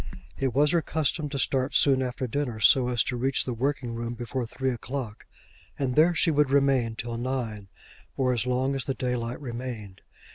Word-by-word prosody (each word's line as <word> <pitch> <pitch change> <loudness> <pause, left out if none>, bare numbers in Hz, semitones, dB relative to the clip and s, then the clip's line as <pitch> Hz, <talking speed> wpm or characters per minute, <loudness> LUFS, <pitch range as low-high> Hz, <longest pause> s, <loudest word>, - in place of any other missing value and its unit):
It 135 -3 -1
was 145 +2 +4
her 170 - +3
custom 155 -1 0
to 140 - -4
start 130 0 +1
soon 135 -2 +4
after 130 0 -2
dinner, 125 -2 -2
so 125 +3 +5
as 120 -2 +2
to 125 - -3
reach 130 +2 +1
the 125 - -2
working 125 0 -2
room 115 +1 -4
before 120 +1 -4
three 130 +3 -2
o'clock, 125 -2 -6 0.5
and 130 -3 -1
there 165 +5 +4
she 165 - +3
would 150 -2 +3
remain 135 -5 +2
till 115 0 -5
nine, 115 -5 -3 0.5
or 130 -2 +2
as 120 0 -1
long 130 +2 +1
as 135 -2 -2
the 135 - -2
daylight 125 -1 -2
remained. 120 -7 -6
130 Hz, 190 wpm, -27 LUFS, 120-135 Hz, 0.5 s, so